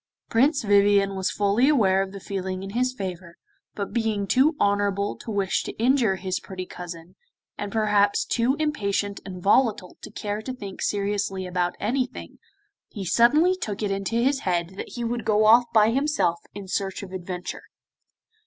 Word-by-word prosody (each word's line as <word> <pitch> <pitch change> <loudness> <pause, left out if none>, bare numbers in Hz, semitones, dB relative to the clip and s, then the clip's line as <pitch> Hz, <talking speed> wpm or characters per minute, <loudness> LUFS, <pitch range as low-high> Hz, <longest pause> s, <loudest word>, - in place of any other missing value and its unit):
Prince 275 +5 +3
Vivien 200 -1 +4
was 190 -1 -1
fully 210 +7 +2
aware 195 -10 +3
of 195 0 -3
the 200 - -8
feeling 190 -1 -4
in 195 - -6
his 250 +3 +1
favour, 185 -6 -7 0.4
but 200 -1 -4
being 220 -3 0
too 270 +9 +3
honourable 200 0 +1
to - - -10
wish 200 -3 0
to - - -6
injure 240 -4 +3
his 185 0 -3
pretty 185 -1 -7
cousin, 175 -1 -9 0.4
and 205 -1 -5
perhaps 210 -2 +2
too 245 +3 +1
impatient 205 -10 -1
and 180 -2 -8
volatile 210 -3 +2
to - - -8
care 210 0 -4
to 255 +3 -5
think 200 -6 -8
seriously 200 -2 -1
about 180 -1 -1
anything, 255 +3 -3 0.5
he 200 -4 -6
suddenly 300 - +4
took 215 - -5
it 205 - 0
into 195 +3 -2
his 265 +4 +2
head 175 -5 -1
that 190 - -8
he 240 - -5
would 235 0 -2
go 215 0 +3
off 235 +3 +7
by 220 0 +5
himself 270 - +1 0.2
in 200 -2 -7
search 195 +1 -3
of 190 - -9
adventure. 180 -1 -6
205 Hz, 170 wpm, -25 LUFS, 190-235 Hz, 0.5 s, off